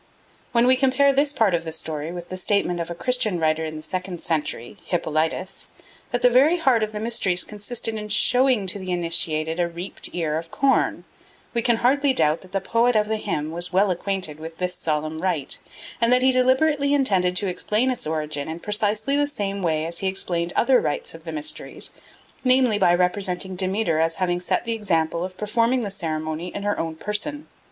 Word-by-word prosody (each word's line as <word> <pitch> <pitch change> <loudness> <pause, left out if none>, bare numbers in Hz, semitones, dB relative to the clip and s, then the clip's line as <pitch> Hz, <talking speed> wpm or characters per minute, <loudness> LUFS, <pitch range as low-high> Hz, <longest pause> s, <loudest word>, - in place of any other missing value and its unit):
When 235 0 +3
we 255 +1 +6
compare 270 +1 +3
this 280 +1 +3
part 220 -9 +2
of 170 -1 0
the 160 - -5
story 155 0 -4
with 175 0 -8
the 185 - -5
statement 185 -2 0
of 170 0 -3
a 170 - -5
Christian 235 -1 +1
writer 160 0 +1
of 155 0 -5
the 155 - -7
second 180 +2 -4
century, 150 - -3
Hippolytus, 165 +1 -2 0.4
that 245 - -2
the 250 - +7
very 285 +8 +5
heart 265 -9 +3
of 215 0 -1
the 210 - -5
mysteries 210 -6 +2
consisted 220 +2 -4
in 210 -1 -5
showing 245 +1 +4
to 190 +2 -2
the 185 -1 -7
initiated 165 -2 0
a 175 - +2
reaped 170 +3 -4
ear 160 -3 -1
of 165 0 -10
corn, 275 +6 +1 0.5
we 235 - +1
can 235 0 +3
hardly 280 +1 +3
doubt 155 -10 +1
that 185 - -16
the 195 - 0
poet 230 +5 +1
of 210 -1 +3
the 220 - 0
hymn 155 -8 -3
was 175 +2 -2
well 190 +1 +3
acquainted 180 -4 -2
with 160 +1 -8
this 180 0 -2
solemn 155 -1 -2
rite, 170 -6 -1 0.4
and 230 +1 +3
that 250 0 +4
he 260 - +5
deliberately 280 +3 +3
intended 190 -10 +1
to 200 - 0
explain 210 +7 0
its 245 - -3
origin 155 -2 -3
in 160 +1 -5
precisely 210 +6 0
the 290 0 +2
same 200 -8 -3
way 160 -3 0
as 170 +1 -4
he 195 - -1
explained 175 -2 -1
other 255 0 +4
rites 145 - -3
of 165 0 -13
the 165 - -5
mysteries, 150 -1 -1 0.5
namely 255 -4 +3
by 180 -3 +4
representing 180 +1 0
Demeter 185 -2 0
as 165 0 +1
having 175 0 0
set 180 - -1
the 230 - -1
example 170 -6 0
of 185 0 -6
performing 230 +5 +1
the 205 -3 -4
ceremony 160 -2 -4
in 200 - -4
her 205 0 -1
own 165 -1 -3
person. 220 - -3
190 Hz, 205 wpm, -23 LUFS, 165-230 Hz, 0.5 s, the